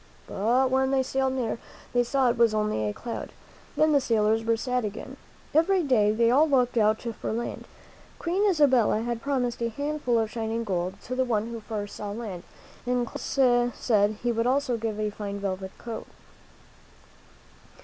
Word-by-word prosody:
" - - -28
But 245 +6 +1
when 265 0 +2
they 265 -1 +2
sailed 265 0 0
near, 235 -3 -2 0.3
they 245 0 +3
saw 255 0 +2
it - - -3
was 230 -2 +4
only 210 - 0
a - - -1
cloud. 235 - -6 0.5
Then 310 0 +3
the 285 -2 +4
sailors 225 -2 +2
were 230 0 +1
sad 250 +1 -1
again. 210 0 -6 0.4
Every 345 +4 +3
day 220 -7 +3
they 230 +2 +3
all 300 +5 +4
looked 250 -3 +2
out 215 -1 +2
for 230 -2 -4
land. 235 +2 -4 0.5
Queen 350 +3 -1
Isabella 260 - +3
had 235 -1 -3
promised 250 -4 -1
a 235 - 0
handful 285 -1 -1
of 220 -1 0
shining 225 0 -2
gold 185 -2 -2
to 255 - -5
the 260 +1 +1
one 230 -2 -1
who 230 - -5
first 210 -2 -5
saw 205 - -5
land, 205 -6 -6 0.5
and 245 -1 +1
Columbus 245 -1 +1
said 210 -2 +2
he 240 - +2
would 230 +1 0
also 260 -1 +1
give 220 -2 -3
a 210 -1 -1
fine 200 -1 -5
velvet 190 -1 -4
coat. 230 -2 -7
235 Hz, 180 wpm, -26 LUFS, 215-260 Hz, 0.5 s, was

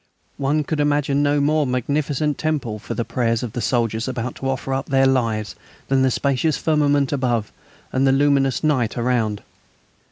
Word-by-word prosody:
One 145 +2 +1
could 150 +1 -3
imagine 145 -1 +1
no 145 0 +2
more 150 0 +2
magnificent 145 +3 -1
temple 140 -9 -2
for - - -6
the 115 - -2
prayers 115 -2 0
of 115 -3 -5
soldiers 115 -2 0
about 125 -1 -3
to 135 - -3
offer 135 0 -2
up 135 +1 -2
their 135 -1 +3
lives 115 -6 0 0.3
than 135 0 +3
the 130 - +3
spacious 140 +4 0
firmament 145 -3 +2
above 120 -6 -1 0.4
and 135 +1 +2
the - - +5
luminous 135 -1 +2
night 130 -8 +1
around. 115 -4 0
135 Hz, 165 wpm, -21 LUFS, 120-145 Hz, 0.4 s, the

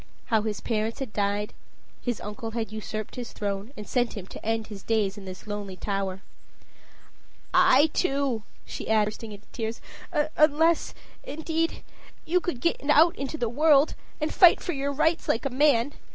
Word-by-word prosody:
How 220 - +5
his 210 -1 -3
parents 220 0 -1
had 265 -6 -5
died 205 0 -1 0.5
his 240 -3 -2
uncle 210 +2 -5
had 225 -1 -3
usurped 215 +1 -5
his 245 -2 -6
throne, 200 +2 -3
and 210 -1 -7
sent 245 -3 0
him 190 - -6
to - - -11
end 225 0 0
his 205 -3 -9
days 210 -3 0
in 200 -2 -10
this 185 +1 -9
lonely 205 -2 -5
tower. 195 0 -3 1.3
"I, 360 -5 +6
too," 275 -8 0
added - - -32
she, - - -6
bursting 215 0 0
into 205 0 -11
tears. 225 -1 -3 0.6
"Unless, 310 +2 +3 0.3
indeed, 320 +3 -2 0.4
you 360 +3 +3
could 345 -9 -4
get 340 - +1
out 320 +3 +6
into 275 +3 -4
the 240 - 0
world, 290 +4 +4 0.3
and 305 0 -1
fight 355 -2 +7
for 350 - -3
your 280 0 -1
rights 320 +4 +1
like 225 - +1
a 275 - -1
man. 275 -1 +3
230 Hz, 170 wpm, -27 LUFS, 210-295 Hz, 1.3 s, fight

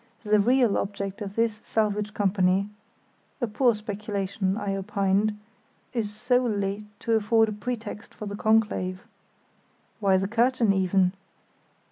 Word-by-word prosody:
The 210 -1 +3
real 240 +1 +3
object 200 0 -4
of 200 -1 -5
this 225 -2 0
salvage 210 -1 -1
company 195 -1 +2 0.7
(a 245 - +1
poor 235 +2 +2
speculation, 200 -2 -2
I 195 -3 -2
opined) 200 +1 0 0.6
is 220 -4 -1
solely 210 -3 0
to 230 - -2
afford 220 0 +3
a - - -3
pretext 215 -1 -5
for 210 - -8
the 200 0 -5
conclave." 205 -4 +1 0.9
"Why 195 -3 +3
the 190 +1 0
curtain, 235 -1 +2
even?" 190 -1 +2
210 Hz, 125 wpm, -26 LUFS, 195-225 Hz, 0.9 s, The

